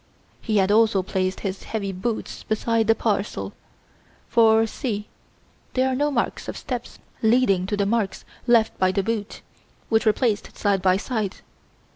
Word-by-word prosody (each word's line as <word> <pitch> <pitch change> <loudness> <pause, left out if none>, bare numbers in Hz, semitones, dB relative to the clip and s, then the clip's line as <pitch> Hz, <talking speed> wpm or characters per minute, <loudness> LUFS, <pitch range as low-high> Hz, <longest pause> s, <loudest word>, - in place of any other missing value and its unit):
He 215 -2 0
had 195 0 +3
also 215 -3 +4
placed 185 0 -2
his 195 -1 -3
heavy 200 -3 -3
boots 205 +5 -4
beside 225 0 0
the 225 - +5
parcel, 210 -2 -2 0.7
for, 225 -1 +5
see 215 -3 -4 0.7
there 260 0 +3
are 260 - 0
no 290 +3 +1
marks 255 -5 -2
of - - -5
steps 250 -4 -5 0.2
leading 220 -5 +3
to 205 - -1
the 200 - +1
marks 210 -2 -1 0.2
left 230 -2 +4
by 185 0 +3
the 195 0 0
boots, 220 -1 -3 0.5
which 220 0 +2
were - - +8
placed 215 -2 -1
side 200 -2 +1
by 185 0 +4
side. 215 -2 -3
215 Hz, 160 wpm, -24 LUFS, 195-230 Hz, 0.7 s, were